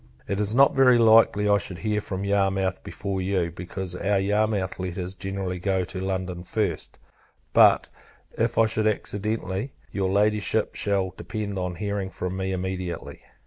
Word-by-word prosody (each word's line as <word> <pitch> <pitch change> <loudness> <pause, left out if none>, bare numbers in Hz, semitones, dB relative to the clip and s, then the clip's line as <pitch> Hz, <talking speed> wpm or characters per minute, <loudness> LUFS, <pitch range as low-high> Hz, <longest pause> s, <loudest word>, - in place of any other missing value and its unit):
It 100 +1 -2
is 105 +2 0
not 140 +2 +6
very 130 -2 +6
likely 110 -2 +5
I 100 0 +4
should 90 - -7
hear 105 +5 -1
from 95 -1 -4
Yarmouth 95 -1 0
before 100 -2 -4
you, 90 -3 0
because 90 +1 -5
our 100 +2 +1
Yarmouth 105 -1 0
letters 90 0 -4
generally 95 -1 -4
go 95 0 0
to 95 +1 -6
London 95 -2 -3
first; 95 -3 -2 0.6
but - - +6 0.5
if 115 +1 0
I 115 - +6
should, 110 0 0
accidentally, 105 +2 -2 0.2
your 95 -2 -1
Ladyship 105 +1 +1
shall 95 -3 0
depend 105 -3 -4
on 90 -1 -3
hearing 100 +1 -3
from 90 -1 -4
me 95 0 -2
immediately. 95 -1 -4
95 Hz, 155 wpm, -25 LUFS, 95-105 Hz, 0.6 s, not